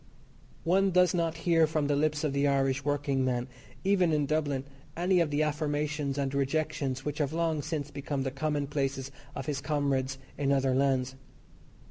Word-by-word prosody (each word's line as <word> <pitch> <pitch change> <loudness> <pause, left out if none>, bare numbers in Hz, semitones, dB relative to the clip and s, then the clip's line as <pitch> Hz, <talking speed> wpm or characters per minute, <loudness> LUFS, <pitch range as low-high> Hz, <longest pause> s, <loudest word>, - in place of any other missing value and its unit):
One 190 +3 +3
does 180 0 +4
not 165 -2 0
hear 165 -2 +5
from 155 -1 0
the 145 0 +2
lips 150 +1 +1
of 150 -3 0
the 140 +1 +2
Irish 135 -1 +1
workingman, 135 -3 0 0.4
even 190 -3 +3
in 150 -2 +2
Dublin, 145 -2 0 0.3
any 180 +1 +3
of 165 -3 +2
the 145 +1 +1
affirmations 150 -1 -1
and 140 -1 -1
rejections 140 -1 -1
which 150 0 -3
have 145 0 0
long 165 -2 0
since 150 -1 -4
become 140 -1 -3
the 135 - -2
commonplaces 140 -1 -2 0.2
of 135 - -4
his 145 -2 -2
comrades 135 -2 0 0.2
in 140 -1 +1
other 135 -1 +2
lands. 130 -1 +1
145 Hz, 165 wpm, -29 LUFS, 135-155 Hz, 0.4 s, hear